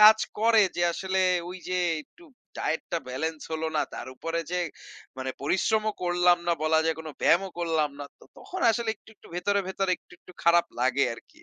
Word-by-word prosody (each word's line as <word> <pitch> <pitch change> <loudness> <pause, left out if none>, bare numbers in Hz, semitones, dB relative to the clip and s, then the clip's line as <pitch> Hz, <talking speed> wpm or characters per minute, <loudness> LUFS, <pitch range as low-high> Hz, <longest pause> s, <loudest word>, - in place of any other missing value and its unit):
কাজ 215 +1 +10 0.2
করে 225 -1 +5
যে 175 - +1
আসলে 190 +2 -1 0.3
ওই 185 +1 -7
যে 185 0 0 0.2
একটু 345 - -21 0.3
ডায়েটটা 165 +1 -1
বেলেন্স 155 +4 -3
হল 160 0 -2
না। - - +3
তার - - -6
উপরে 165 +4 -2
যে 180 0 0 0.6
মানে 130 0 -2
পরিশ্রমও 215 +7 +1
করলাম 175 0 +4
না - - +5
বলা 160 0 +4
যায় 160 -1 +1
কোনো 160 -1 -7
ব্যায়ামও 190 +4 +4
করলাম 160 -3 +1
না। 145 - -5
তো - - -17
তখন 375 - -7
আসলে 225 0 -1
একটু, 210 - -24
একটু - - -18
ভেতরে, 200 +3 +1
ভেতরে 190 0 -1
একটু, - - -25
একটু 180 - -16
খারাপ 170 0 +5
লাগে 130 +2 +3
আরকি। - - -18
175 Hz, 190 wpm, -27 LUFS, 160-195 Hz, 0.6 s, কাজ